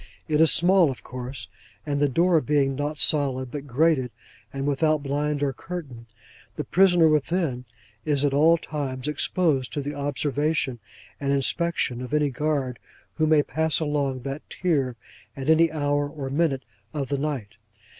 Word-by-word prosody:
It 155 -1 +2
is 160 - +6
small, 180 -2 +5
of 130 - -7
course; 125 +1 -7 0.4
and 145 -2 -1
the 145 0 +3
door 170 +3 +3
being 140 0 +1
not 145 +2 -3
solid, 130 -4 +1
but 145 -1 -6
grated, 140 -1 +2 0.4
and 135 0 -4
without 150 +1 +1
blind 145 +1 -1
or 140 -2 0
curtain, 135 -8 -8 0.5
the - - -3
prisoner 175 -3 +4
within 150 -4 0 0.4
is 145 -2 +1
at 140 - +1
all 160 +4 +5
times 140 -4 -5
exposed 150 -3 +1
to 145 - -2
the 145 +1 -4
observation 145 -1 -1 0.4
and 140 -1 -1
inspection 140 -2 +1
of 130 +4 -3
any 150 -2 +2
guard 135 -3 -2 0.4
who 155 - +3
may 155 -2 +4
pass 160 +1 0
along 145 -4 -1
that 140 +3 -5
tier 140 -9 0 0.4
at 135 +3 +1
any 165 0 +4
hour 145 -1 0
or 140 -3 -6
minute 140 -3 0 0.3
of 140 -3 -3
the 140 -1 -1
night. 135 -8 -3
145 Hz, 160 wpm, -25 LUFS, 135-155 Hz, 0.5 s, is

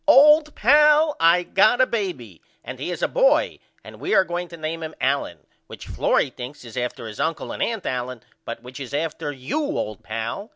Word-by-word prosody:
Old 300 +1 +6
pal 300 +4 +5
I 170 +2 +4
got 215 +7 +3
a 255 - +6
baby 175 - -4 0.2
and 130 0 -8
he 145 - -4
is 175 - -4
a - - +3
boy - - +2 0.2
and - - -12
we 385 - 0
are - - +6
going 175 0 -4
to 170 - -11
name 160 +1 -4
him 160 0 -6
Allen - - -1 0.2
which - - -10
Florrie 135 - 0
thinks 125 +1 -9
is 115 - -11
after 125 -1 -4
his 110 -2 -9
uncle 165 +1 -2
and - - -6
aunt 225 -4 -2
Allen 125 -2 -4 0.2
but 115 - -7
which 130 +2 -10
is 135 0 -6
after 150 -1 -3
you 135 - -4
old 110 - -3
pal. 115 - -5
165 Hz, 205 wpm, -23 LUFS, -, 0.2 s, Old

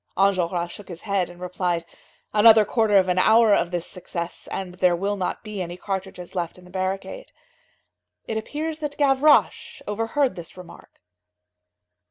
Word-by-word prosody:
Enjolras 180 -3 +1
shook 205 - -11
his 175 -2 -9
head 195 -4 -1
and 175 0 -13
replied: 180 -2 -2 0.5
"Another 215 0 +7
quarter 215 -1 +2
of 190 -1 +4
an 180 0 +1
hour 220 +2 +5
of 175 -3 +2
this 175 -1 -3
success, 175 -1 -6
and 185 -2 -4
there 180 -1 +4
will 200 +4 -1
not 185 -2 -3
be 215 -3 -5
any 175 0 -5
cartridges 190 -2 -5
left 175 -2 -3
in 180 - -16
the 180 - -16
barricade." 190 - -4 0.9
It 225 - -4
appears 305 +8 -4
that 295 -2 -5
Gavroche 285 +1 +3
overheard 225 +6 0
this 170 0 -9
remark. 180 -2 -14
190 Hz, 160 wpm, -24 LUFS, 180-220 Hz, 0.9 s, Another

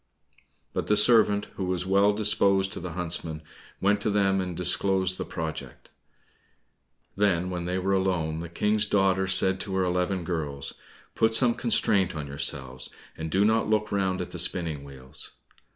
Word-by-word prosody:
But - - -3
the 105 - +2
servant, 105 -2 +4
who 95 - -3
was 90 -1 -2
well 100 +2 +3
disposed 100 -2 +1
to - - -5
the 90 -1 -7
huntsmen, 80 -2 -4 0.4
went 105 +1 +1
to 105 - 0
them, 100 -2 +1
and 90 -2 -5
disclosed 95 0 +2
the - - -4
project. 80 -6 -7 1.3
Then 95 -3 0
when 90 -1 -4
they 90 +1 -2
were 95 +1 -1
alone 90 -5 -1
the 85 0 -7
King's 105 +4 0
daughter 95 -1 +1
said 95 0 +4
to 95 -1 -4
her 95 - +1
eleven 90 +1 -1
girls, 75 -5 -4 0.4
"Put 110 0 +1
some 120 -1 +3
constraint 100 -7 +1
on 75 -2 -5
yourselves, 65 -2 0 0.3
and 80 0 -6
do 95 +5 +1
not 110 0 +1
look 105 -1 0
round 95 -2 -1
at - - -7
the - - -7
spinning 80 -6 +5
wheels." 65 -2 -10
95 Hz, 170 wpm, -26 LUFS, 85-100 Hz, 1.3 s, spinning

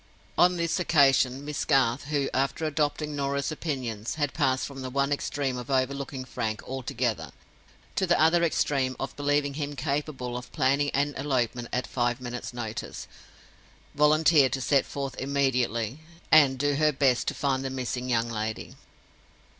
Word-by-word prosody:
On 180 0 +4
this 170 +1 0
occasion, 135 -5 +3
Miss 150 0 -3
Garth—who, 135 +2 +1
after 135 +4 0
adopting 150 0 -1
Norah's 140 +1 -1
opinions, 130 -8 -3
had 145 -3 -1
passed 135 -4 +1
from 135 -1 -8
the 130 - -4
one 140 +2 0
extreme 140 -2 -1
of 125 - -8
over 130 0 +2
looking 135 -1 -6
Frank 110 -3 -3
altogether, 120 - -2 0.7
to 190 - +2
the 175 - +3
other 165 +2 +4
extreme 135 -5 +1
of 135 - -4
believing 145 0 0
him 145 0 -4
capable 140 -4 -3
of 125 0 -7
planning 140 0 +2
an 145 +1 +1
elopement 125 -4 -1
at 125 - -1
five 120 -1 -1
minutes' 125 -1 -6
notice—volunteered 145 +5 -1
to 135 - -1
set 140 +1 +2
forth 140 -2 -4
immediately, 130 -3 0 0.3
and 140 -4 +6
do 145 +2 +1
her 155 0 +4
best 135 -3 +2
to - - -1
find 135 -2 0
the 135 - -2
missing 130 -1 -3
young 115 -1 +1
lady. 110 0 -4
135 Hz, 155 wpm, -27 LUFS, 125-145 Hz, 0.7 s, and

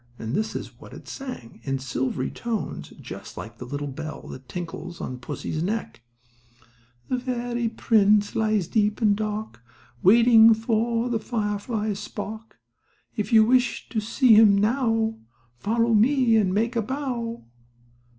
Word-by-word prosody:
And 115 +1 -5
this 220 +5 -1
is - - -7
what - - -13
it - - -12
sang, 255 - -8
in 135 +2 -2
silvery 130 0 -2
tones, 230 -3 -4
just - - -9
like 115 +1 -8
the 125 - -7
little 145 +3 -4
bell 155 +3 -7
that 130 -1 -10
tinkles 170 +1 -6
on 125 -1 -5
pussy's 155 +4 -4
neck: 210 - -3 1.1
The 255 - -1
fairy 240 -2 -2
prince 210 -2 +3
lies 215 -5 +1
deep 210 -1 +1
and 210 -3 +3
dark, 215 - -4 0.4
Waiting 225 +2 +7
for 230 +1 0
the 235 -2 -1
firefly's 210 -2 -2
spark; 220 +2 -7 0.6
If 210 -2 -3
you 220 -1 +7
wish 250 +1 +1
to 225 - -1
see 225 +3 +3
him 210 -2 +7
now, 225 0 +1 0.4
Follow 230 +2 +1
me, 240 +2 +4
and 205 -4 +3
make 230 +5 0
a 230 - +2
bow. 240 - -4
220 Hz, 145 wpm, -25 LUFS, 200-235 Hz, 1.1 s, Waiting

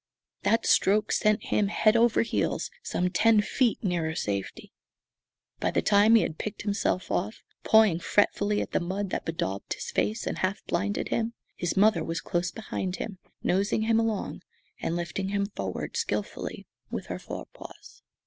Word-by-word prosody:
That 225 +2 +2
stroke 210 +2 +3
sent 215 +1 +2
him 205 - +1
head 215 +2 +3
over 230 -1 +4
heels 230 - -1
some 180 - -1
ten 220 +4 +4
feet 235 +3 +1
nearer 170 -4 -1
safety. 100 - -4 0.9
By - - +1
the - - 0
time 210 +2 +5
he 225 - +6
had 160 - -4
picked 215 - -5
himself 200 -3 -1
up, 205 +5 0 0.3
pawing 220 -6 +5
fretfully 205 +2 +2
at - - -10
the - - +2
mud 190 +2 -3
that - - -2
bedaubed 100 -12 -3
his - - -6
face 220 +2 0
and - - -3
half 190 +2 -1
blinded 205 +4 -1
him, 230 0 -1 0.2
his 175 - -2
mother 215 +2 +4
was 165 0 -2
close 175 +2 -1
behind 190 -4 -4
him, 195 -3 -6 0.2
nosing 200 +4 +1
him 225 0 +3
along 225 -3 -2 0.4
and 165 - -2
lifting 175 +3 -3
him 200 0 0
forward 100 - -5
skilfully - - -3 0.2
with - - -4
her - - -5
fore - - -7
paws. - - -13
200 Hz, 170 wpm, -27 LUFS, 180-215 Hz, 0.9 s, he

